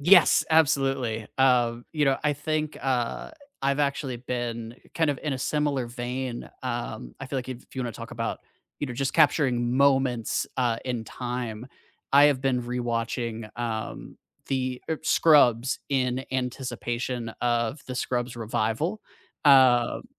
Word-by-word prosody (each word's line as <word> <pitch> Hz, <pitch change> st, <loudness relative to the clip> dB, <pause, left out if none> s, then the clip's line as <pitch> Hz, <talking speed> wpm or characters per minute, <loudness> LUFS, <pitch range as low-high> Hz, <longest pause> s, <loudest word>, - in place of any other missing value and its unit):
Yes, 175 Hz, +3 st, +6 dB
absolutely, 135 Hz, -7 st, +2 dB
um, 120 Hz, -2 st, +3 dB
you 150 Hz, -2 st, +2 dB
know, 135 Hz, -1 st, +2 dB
I 150 Hz, -, +3 dB
think, 155 Hz, +1 st, -2 dB
uh, 125 Hz, -3 st, -1 dB, 0.3 s
I've 140 Hz, +1 st, +1 dB
actually 140 Hz, -3 st, -1 dB
been 120 Hz, -2 st, -4 dB, 0.2 s
kind 160 Hz, -2 st, +2 dB
of 145 Hz, -2 st, 0 dB
in 150 Hz, -, -1 dB
a 130 Hz, -, -3 dB
similar 145 Hz, -2 st, 0 dB
vein, 120 Hz, +1 st, -5 dB
um, -, -, -4 dB
I 135 Hz, -, -5 dB
feel 135 Hz, +1 st, -2 dB
like 130 Hz, -, -6 dB
if 125 Hz, -1 st, -7 dB
you 130 Hz, -, -3 dB
wanna 120 Hz, -2 st, -3 dB
talk -, -, -9 dB
about, -, -, -3 dB, 0.4 s
you 145 Hz, -, -1 dB
know, 125 Hz, -, -5 dB
just 135 Hz, +2 st, -1 dB
capturing 130 Hz, -5 st, +3 dB
moments, 130 Hz, -4 st, +2 dB
uh, 120 Hz, -3 st, +1 dB
in 120 Hz, -3 st, -3 dB
time, 120 Hz, -2 st, -5 dB, 0.5 s
I 140 Hz, +1 st, +8 dB
have 145 Hz, -3 st, +4 dB
been 130 Hz, -2 st, +1 dB
rewatching, 115 Hz, -2 st, -3 dB
um, 115 Hz, -2 st, -4 dB, 0.3 s
the 130 Hz, -1 st, -2 dB
er 160 Hz, -, 0 dB
Scrubs 130 Hz, -6 st, +4 dB
in 130 Hz, -1 st, 0 dB
anticipation 125 Hz, -2 st, -3 dB
of 120 Hz, +3 st, 0 dB
the 130 Hz, -, -5 dB
Scrubs 125 Hz, -1 st, -2 dB
revival. 120 Hz, -, -1 dB, 0.5 s
Um 130 Hz, -4 st, +5 dB
125 Hz, 145 wpm, -26 LUFS, 120-140 Hz, 0.5 s, I